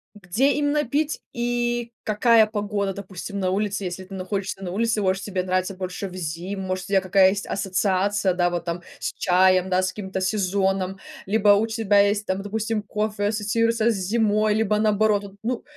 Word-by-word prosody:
где 205 +9 +1
именно 295 0 +1
пить 295 +5 -1
и 240 0 -1
какая 220 +1 +4
погода, 205 -2 -2
допустим, 200 +1 -7
на 185 -1 0
улице, 200 0 -1
если 180 +1 -5
ты 195 +1 -9
находишься 190 +1 -4
на 175 - -4
улице, 220 +1 0
может 190 +1 +1
тебе 190 -3 -2
нравится 185 +1 -1
больше 185 +1 -5
в 180 - -11
зиму, 180 +3 -4
может, 185 -1 -3
у - - -11
тебя 195 -1 +3
какая 190 0 +5
есть 200 +1 -3
ассоциация, 195 0 0
да, 175 0 +2
вот 175 -1 -3
там: 170 +1 -3 0.2
с - - -3
чаем, 185 0 +3
да, 185 0 +2
с 185 - +1
каким-то 190 -1 -5
сезоном, 190 -1 0 0.3
либо 210 0 +2
у 205 +2 +5
тебя 220 -3 +2
есть 205 +1 +2
там, 190 +1 -2
допустим, 220 +1 -2
кофе 210 0 -2
ассоциируется 230 +2 +1
с - - -2
зимой, 210 +2 +1
либо 215 -1 +1
наоборот 210 -1 +2
вот? 195 0 -12
Ну, 245 0 -2
200 Hz, 185 wpm, -23 LUFS, 185-215 Hz, 0.3 s, какая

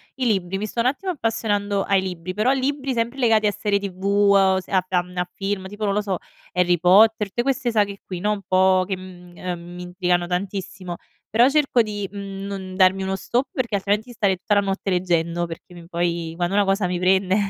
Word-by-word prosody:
i 265 -1 -2
libri, 195 -4 0
mi 205 - -3
sto 215 - -5
un 235 - +3
attimo 370 +8 -1
appassionando 210 - -1
ai 195 -1 +2
libri, 185 -1 -5
però 215 +6 +2
libri 275 0 -1
sempre 235 +3 -2
legati 225 -3 +3
a 210 - +3
serie 205 0 0
tv, 190 -2 -7
uhm, 200 -1 +4
s 190 - -5
a 190 -2 +3
f 185 - -27
a 180 -1 +2
mhmm, 180 0 -14
a 180 0 -1
film, 195 -1 -3
tipo, 205 +2 -5
non 200 - +1
lo 210 - +1
so, 195 -3 -2 0.3
Harry 180 -1 +2
Potter, 210 +4 +5
te 240 - -1
queste 250 -2 0
saghe 205 -3 0
qui, 180 -2 -5
no, 210 +4 0
un 210 -1 -2
po' 185 0 +4
che, 190 -1 -2
mhmm, 180 -1 -12
ehm, 180 -1 -4 0.2
mi 180 - -7
intrigano 180 -1 0
tantissimo, 185 0 -4 0.3
però 235 +3 +5
cerco 275 -4 +3
di, 205 -2 -4
mhmm, 195 -1 -6
non 190 -2 -6
darmi 190 0 +4
uno 190 0 -1
stop 245 +7 -1
perché 235 -5 -1
altrimenti 205 +4 -1
stare 200 -4 +2
i - - -5
tutta 205 +3 0
la 205 - +4
notte 195 0 -2
leggendo, 175 -2 0
perché 170 +1 -10
mi 170 -1 -12
poi 170 -1 -2
quando 175 +2 -1
una 205 0 +4
cosa 195 0 +1
mi 180 0 -1
prende 190 +1 +2
195 Hz, 230 wpm, -22 LUFS, 180-210 Hz, 0.3 s, Potter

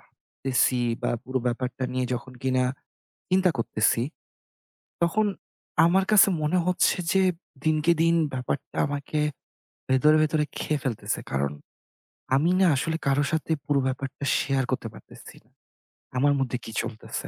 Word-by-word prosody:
ভাবতেছি 130 -1 -1 0.2
বা - - 0
পুরো 130 0 -1
ব্যাপারটা 125 +1 -2
নিয়ে 130 0 0
যখন 125 +1 -7
কিনা 130 -1 +2 0.6
চিন্তা 185 0 +3
করতেছি। 115 0 +1 1.0
তখন 170 +6 +2 0.6
আমার 190 +3 +3
কাছে 205 0 +7
মনে 150 +4 +2
হচ্ছে 180 +1 +2 0.2
যে, 190 - +4 0.4
দিনকে-দিন 160 +2 +3 0.2
ব্যাপারটা 130 +1 -4
আমাকে 145 +1 -3 0.7
ভেতরে, 150 +4 +5
ভেতরে 155 0 +1
খেয়ে 150 -1 -1
ফেলতেছে, 125 -6 -2
কারণ 70 +1 0 0.8
আমি 155 +6 +2
না 190 - +6
আসলে 160 +4 -1
কারো 140 +1 +3
সাথে 160 0 -1
পুরো 145 -1 +2
ব্যাপারটা 135 +1 -5
শেয়ার 135 -1 0
করতে 125 -3 -2
পারতেছি - - -14
না। - - -32 0.7
আমার 145 +2 +4
মধ্যে 125 -2 -1
কি - - -7
চলতেছে। 110 - -6
140 Hz, 130 wpm, -26 LUFS, 130-160 Hz, 1.0 s, কাছে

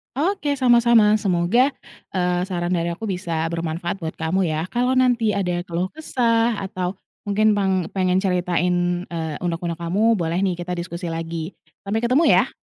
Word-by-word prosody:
Oke 295 -2 0
sama-sama, 235 -4 +5
semoga, 210 +6 +2 0.4
eee, 180 -1 0
saran 180 -1 -2
dari 170 0 -1
aku 215 +6 -5
bisa 170 -4 -2
bermanfaat 170 +1 -3
buat 165 -4 -5
kamu 170 +4 +1
ya, 160 0 -1
kalau 245 +5 0
nanti 245 -4 +3
ada 180 -3 -1
keluh 175 +1 -2
kesah 235 -4 +1
atau 185 -1 -4 0.2
mungkin 210 +1 +2
pang 190 -4 0
pengen 185 0 +2
ceritain, 180 -1 0
eee, 160 -3 -4
unek-unek 170 -1 -3
kamu, 200 +5 +2
boleh 165 0 -1
nih 180 -3 -1
kita 180 +1 -3
diskusi 170 0 -5
lagi. 165 +1 -4 0.3
Sampai 220 +3 -1
ketemu 255 +7 +3
ya. - - +4
180 Hz, 155 wpm, -22 LUFS, 170-220 Hz, 0.4 s, sama-sama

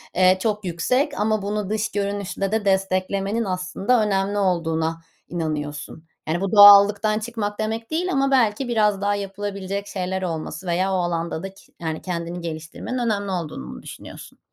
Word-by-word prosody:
eee, 185 +1 +5
çok 210 -3 -1
yüksek 250 - 0
ama 215 0 +1
bunu 205 0 -2
dış 215 0 -1
görünüşle 200 -1 -2
de 220 -2 0
desteklemenin 195 +3 0
aslında 195 +5 0
önemli 200 0 0
olduğuna 165 -3 0 0.3
inanıyorsun. 155 -1 -4 0.2
Yani, 170 +3 -1
bu 195 +1 -1
doğallıktan 205 +1 +8
çıkmak 215 -2 -4
demek 225 +3 -3
değil 355 +4 0
ama 275 0 +1
belki 245 0 +2
biraz 210 -4 +2
daha 205 0 +1
yapılabilecek 200 0 -4
şeyler 190 -1 -3
olması 165 0 -4
veya 185 +3 +1
o - - +2
alanda 170 -2 -2
da 195 0 -6
ki - - -20
yani 160 -1 -3
kendini 175 -1 -4
geliştirmenin 165 +9 -5
önemli 205 -4 -1
olduğunu 160 - -4
mu - - -9
düşünüyorsun? - - -11
195 Hz, 155 wpm, -23 LUFS, 175-210 Hz, 0.3 s, doğallıktan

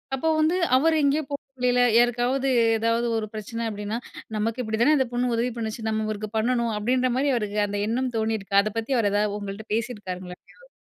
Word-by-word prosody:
அப்ப 265 - -6
வந்து, 315 +3 +3 0.2
அவர் 320 +3 +3
எங்கேயோ 285 +2 +2
போற 280 - -2 0.2
வழியில 250 0 +3 0.2
யாருக்காவது 245 +3 +2 0.3
ஏதாவது 230 +1 +1
ஒரு 215 -1 -3
பிரச்சினை 230 +2 -5
அப்படின்னா, 210 +1 -4 0.4
நமக்கு 225 +3 -1
இப்படித்தானே 230 +7 +3
அந்தப் 260 -3 0
பொண்ணு 245 0 0
உதவி 240 +2 0
பண்ணுச்சு. 220 0 -4
நம்ம 220 0 -1
இவருக்கு 215 0 -4
பண்ணனும், 235 0 +1
அப்படின்ற 250 +4 +1
மாதிரி 280 +1 +2
அவருக்கு 210 -2 -2
அந்த 205 0 -3
எண்ணம் 250 +1 -1
தோணியிருக்கா, 220 -3 0
அதைப்பத்தி 225 +4 -2
அவர் 210 -4 +2
ஏதாவது 205 0 +1
உங்ககிட்ட 200 +1 -7
பேசியிருக்காரங்களா 185 -6 -5
எங்கேயாவது? - - -21
230 Hz, 175 wpm, -25 LUFS, 215-250 Hz, 0.4 s, வந்து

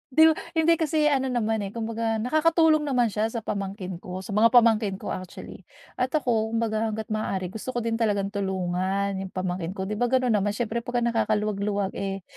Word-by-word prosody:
Di 315 - +8
ba - - +2 0.2
hindi 325 +1 +4
kasi 310 -2 +2
ano 265 -2 +1
naman 225 -3 0
eh, 200 +1 -5
kung 230 - -3
baga 225 0 -1
nakakatulong 310 +5 +3
naman 245 -5 +2
siya 215 +2 0
sa 225 0 -5
pamangkin 195 -3 -4
ko, 185 +1 -7
sa 205 - -8
mga 215 +3 +5
pamangkin 225 -4 +4
ko - - -6
actually. 185 -1 -8 0.3
At 255 +4 0
ako, 230 -6 0
kung - - +2
baga 220 0 0
hangga't 220 0 -5
maaari 195 -4 -2
gusto 240 +5 -6
ko 240 - -1
din 230 0 -1
talagang 200 -3 0
tulungan 190 0 -1
yung 195 - -4
pamangkin 185 -1 -3
ko. 190 - -3
Di 210 +2 -4
ba 245 - +2
gano'n 255 0 +2
naman, 205 -1 +1
siyempre 235 +1 -1
'pag 245 0 -2
nakakaluwag-luwag 210 -3 0
eh 195 -1 -3
220 Hz, 205 wpm, -26 LUFS, 195-240 Hz, 0.3 s, Di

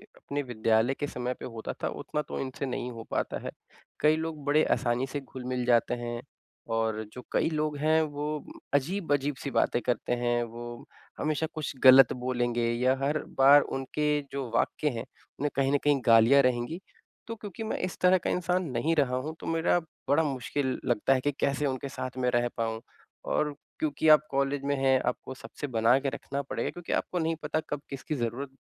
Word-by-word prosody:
अपने 145 0 -4
विद्यालय 115 0 +2
के 145 +1 -3
समय 125 -2 -3
पे - - -6
होता 115 -2 -5
था - - +2
उतना 150 - -3
तो 150 - -6
इनसे 135 +1 -4
नहीं 125 -1 -3
हो 115 -1 -8
पाता - - -1
है। - - -3 0.5
कई 155 +1 +4
लोग 160 -2 -4
बड़े 150 +2 +4
आसानी 120 +2 +1
से 145 +2 -4
घुल-मिल 125 -1 -4
जाते 120 -1 +3
हैं। 120 0 -4 0.5
और 110 -1 0
जो 125 - -8
कई - - +2
लोग 155 -2 -1
हैं 155 +2 +3
वो 145 -2 -3 0.5
अजीब-अजीब 145 -2 +1
सी 140 - -2
बातें 120 - +2
करते 120 0 -1
हैं। 120 0 +1
वो 120 +1 -8 0.3
हमेशा 155 +1 0
कुछ 155 -2 -4
गलत 130 -1 +9
बोलेंगे 120 -1 -1
या 125 +2 +2
हर 145 +3 +1 0.2
बार 140 +2 +8
उनके 135 +3 -2 0.2
जो 135 -3 -4
वाक्य 150 - +1
है - - -2
उनमें 145 - -6
कहीं 135 0 +2
न 145 - +4
कहीं 145 -1 +3
गालियाँ 115 +5 +7
रहेंगी। 125 +6 0 0.5
तो 230 - -4
क्योंकि 210 0 -7
मैं 220 - -2
इस 185 - -6
तरह 185 +1 +6
का 180 - -3
इंसान 180 +1 0
नहीं 140 +7 +1
रहा 135 -4 +2
हूँ 150 +5 -3
तो - - -8
मेरा 165 +2 +2 0.3
बड़ा 160 +3 +4
मुश्किल 135 -1 -2
लगता 120 +2 +2
है 130 - +1
कि 145 +2 +1
कैसे 140 +1 +1
उनके 135 0 -2
साथ 130 -1 -6
में 125 -1 +1
रह 120 0 +2
पाऊँ। 115 0 -2 0.4
और 150 -1 0 0.2
क्योंकि 155 0 0
आप 150 -2 +8
कॉलेज 140 0 0
में 140 0 +1
हैं, 135 -1 +3
आपको 125 +1 -3
सबसे 145 +2 -7
बना 115 0 +4
के 135 0 -1
रखना 140 +1 -4
पड़ेगा 140 - -3
क्योंकि 175 -1 -5
आपको 180 - -1
नहीं 165 0 0
पता 150 +1 0
कब 145 - -3
किसकी 140 +3 -4
ज़रूरत, 125 +2 -3
135 Hz, 195 wpm, -28 LUFS, 125-150 Hz, 0.5 s, गलत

